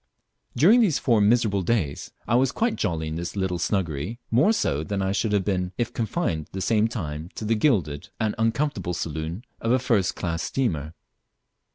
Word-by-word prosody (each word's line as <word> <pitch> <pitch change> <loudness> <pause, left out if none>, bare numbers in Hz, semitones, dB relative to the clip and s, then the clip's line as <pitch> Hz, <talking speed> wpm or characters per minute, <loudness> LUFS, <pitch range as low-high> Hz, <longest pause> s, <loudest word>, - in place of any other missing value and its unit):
During 200 - +6
these 190 -10 +3
four 115 -4 +2
miserable 105 -2 +3
days 90 -8 -1 0.2
I - - 0
was 130 +1 +3
quite 230 - 0
jolly 80 -6 -1
in 80 - -4
this 85 +3 -5
little 95 -3 -1
snuggery 85 +1 -1
more 130 - +4
so 80 - 0
than 100 +4 -3
I 95 0 0
should 105 +2 0
have 100 -3 +1
been 90 -2 -1
if 120 - -2
confined 110 - -2
the 95 - -3
same 110 +3 +2
time 80 -7 -5
to 110 - -5
the 110 - +2
gilded 100 - +1
and 110 -2 0
uncomfortable 115 - 0
saloon 80 - -4
of 115 - 0
a 130 - +5
first 115 -7 +1
class 85 -3 -2
steamer. 80 - -2
100 Hz, 185 wpm, -25 LUFS, 85-120 Hz, 0.2 s, During